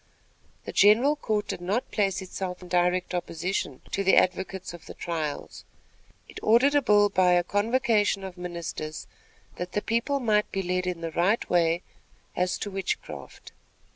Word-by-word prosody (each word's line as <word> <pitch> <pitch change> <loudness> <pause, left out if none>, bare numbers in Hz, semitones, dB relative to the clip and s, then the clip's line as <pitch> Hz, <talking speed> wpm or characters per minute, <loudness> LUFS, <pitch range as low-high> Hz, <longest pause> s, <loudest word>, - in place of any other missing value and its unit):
The - - -6
general 230 +9 +5
court 215 -7 -1
did - - -4
not 200 +8 -2
place 195 -3 0
itself 185 -1 -5
in 180 - -11
direct 180 +1 +1
opposition 175 -5 -3
to 195 - 0
the 195 - +5
advocates 190 0 0
of 170 -2 -12
the - - -9
trials. 160 -4 -4 0.6
It - - -9
ordered 240 +6 +4
by 290 - +5
bill 205 -6 +4
a 180 -1 +4
convocation 210 0 +1
of 190 -2 -7
ministers, 170 -3 -6 0.5
that 180 0 -5
the 210 - 0
people 255 +5 0
might 215 -4 +1
be 195 - -2
led 185 0 -1
in 175 -2 -3
the 165 -1 -4
right 185 +8 +1
way, 170 0 +2 0.5
as 180 0 0
to 205 - -4
the 195 - -7
witchcraft. 195 - -5
185 Hz, 165 wpm, -27 LUFS, 175-210 Hz, 0.6 s, general